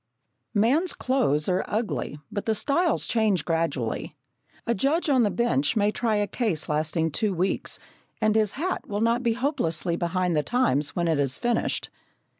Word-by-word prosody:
Man's 275 - +3
clothes 235 - +1
are 185 0 +1
ugly, 215 -8 -2
but 205 - -4
the 220 - +2
styles 325 - +1
change 215 -6 +1
gradually. 150 -6 -2 0.5
A 235 - +1
judge 290 - +1
on 260 -2 +4
the 215 - +3
bench 200 - +1
may 210 -1 +2
try 225 -1 0
a 205 0 +2
case 200 -7 -1
lasting 155 +2 0
two 210 +3 0
weeks, 185 +3 -1 0.4
and 215 -1 +2
his 215 -2 +2
hat 360 +6 -3
will 205 0 -2
not 230 +2 +2
be 235 -2 +1
hopelessly 225 - -1
behind 175 0 0
the 150 - +3
times 150 - +1
when 175 -1 0
it 160 -3 +1
is 135 -2 +1
finished. 240 -1 -1
210 Hz, 170 wpm, -26 LUFS, 165-240 Hz, 0.5 s, on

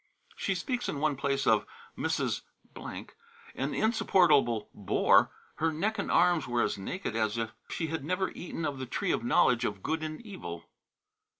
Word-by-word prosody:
She - - -1
speaks 250 -2 -2
in 140 - -3
one 150 -1 +1
place 140 0 0
of - - +3 0.3
"Mrs., - - -1 0.3
an 465 0 -7
insupportable 170 - +3
bore; 100 - +4 0.3
her 165 0 +1
neck 205 +7 -1
and - - -2
arms 170 -4 +4
were 120 -1 +1
as - - 0
naked 115 - -4
as 110 0 0
if 115 -1 -2 0.2
she 165 - -2
had 160 -2 -3
never 185 +5 -1
eaten 165 -2 -5
of 140 -3 -3
the 130 - -4
tree - - -1
of - - 0
the 120 - -4
knowledge 120 -1 +4
of 105 -4 -3
good 160 0 -1
and 155 0 -4
evil." 85 - -7
155 Hz, 175 wpm, -30 LUFS, 120-185 Hz, 0.3 s, bore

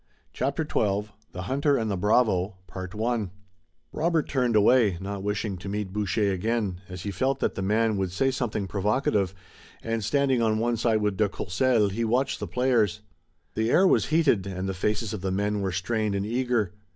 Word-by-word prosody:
CHAPTER 140 +4 -1
XII 105 -7 -1 0.2
THE 90 - -6
HUNTER 140 +6 +1
AND 110 -2 -1
THE - - 0
BRAVO 100 -1 +2 1.4
Robert 165 0 +1
turned 125 -4 +1
away, 105 -3 +4
not 100 +1 -5
wishing 105 0 -2
to 95 +2 -7
meet 100 -2 -3
Boucher 105 0 0
again, 100 -2 -1
as 90 -2 -7
he 100 - -3
felt 130 +8 0
that - - 0
the - - -4
man 110 +2 +1
would 95 -2 -1
say 135 +9 +1
something 120 -6 -2
provocative, 105 - 0 0.5
and, 115 -1 -2
standing 130 +2 +2
on 110 -1 +2
one 120 +2 +1
side 110 -1 +1
with 105 -2 0
de 105 -2 +2
Courcelles, 105 +3 +1
he 115 +4 -2
watched 125 +4 0
the - - -4
players. 115 -6 +1 0.5
The 110 +1 0
air 185 +9 +5
was - - +3
heated, 150 - +2
and 95 0 -4
the 95 - -2
faces 105 +3 -1
of 105 - -5
the 95 - -1
men 100 +2 0
were 95 -1 -1
strained 105 +3 -1
and 100 0 -1
eager. 120 -4 0
105 Hz, 185 wpm, -26 LUFS, 95-120 Hz, 1.4 s, air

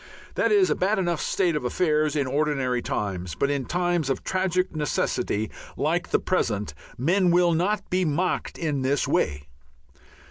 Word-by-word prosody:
That - - +1
is 400 -3 +4
a - - +2
bad 195 +4 +1
enough 175 -4 0
state 180 -5 +1
of 150 - -2
affairs 155 +2 +1
in 145 -2 +1
ordinary 135 -3 0
times, 90 -8 -3
but 140 +10 0
in 140 -3 -1
times 175 -4 0
of 135 - -1
tragic 185 -2 0
necessity 110 -7 -1 0.3
like 170 +4 0
the - - +3
present 105 - -1 0.2
men 175 - +2
will 175 0 +4
not 195 +5 0
be 185 +1 +2
mocked 175 +3 -1
in 150 -5 -1
this 135 +2 +1
way. 75 -1 0
155 Hz, 165 wpm, -25 LUFS, 135-180 Hz, 0.3 s, is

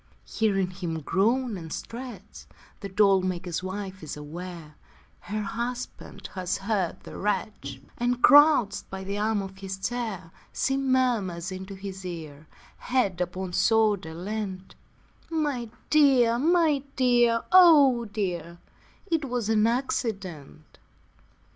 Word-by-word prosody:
Hearing 195 -4 0
him 175 -4 -4
groan 225 - +1
and 160 -2 -9
stretch 230 -5 -8 0.3
The 200 - -6
doll 195 -1 +4
maker's 180 -2 -3
wife 190 0 -6
is 155 -2 -6
aware 165 +1 -8 0.5
Her 215 +1 -4
husband 240 +4 -5
has 185 -2 -2
heard 195 -4 -2
the - - -10
wretch, 195 -9 -3 0.2
And 245 0 0
crouched 290 -8 +6
by 190 0 -6
the 200 +2 -3
arm 215 -1 0
of 190 0 -10
his 190 -1 -5
chair, 200 -5 -4 0.2
She 270 - 0
murmurs 240 -10 0
into 190 +1 -7
his 190 0 -8
ear, 155 -4 -8 0.3
Head 225 -9 0
upon 180 +1 -3
shoulder 205 -5 +2
leant: 190 0 -5 0.6
'My 290 -8 -1 0.2
dear, 260 -6 +5
my 320 -1 +3
dear, 240 -3 +3
oh 295 -10 +7
dear, 180 -5 -4 0.5
It 325 -6 0
was 245 -4 -2
an 220 0 +3
accident.' 195 - -3
205 Hz, 120 wpm, -26 LUFS, 185-245 Hz, 0.6 s, oh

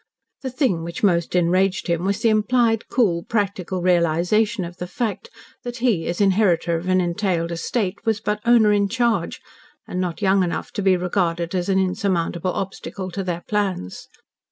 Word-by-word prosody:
The 265 - -3
thing 250 - 0
which 170 +3 -6
most 170 -3 +2
enraged 185 +2 +2
him 170 0 -1
was 200 +2 -1
the 230 - +5
implied 225 +1 +2
cool, 185 -9 +2
practical 190 -3 -2
realisation 180 +5 +2
of 175 +1 -9
the 180 - -5
fact 235 - -3 0.3
that 245 0 -6
he, 230 -10 +1
as 170 - -2
inheritor 190 -4 +2
of 165 +2 -4
an 185 0 +3
entailed 175 -1 -1
estate, 195 +4 -2
was 225 -2 0
but 210 0 -2
owner 230 -3 +5
in 200 -1 +2
charge, 230 -6 0 0.5
and 180 - -3
not 175 -2 -3
young 195 -1 +3
enough 175 -2 -2
to - - -3
be 190 -2 +3
regarded 175 -2 -1
as 180 0 -1
an 190 - +3
insurmountable 185 -2 0
obstacle 190 0 -5
to 195 +3 -3
their 175 -2 -3
plans. 195 - -2
190 Hz, 175 wpm, -22 LUFS, 175-210 Hz, 0.5 s, the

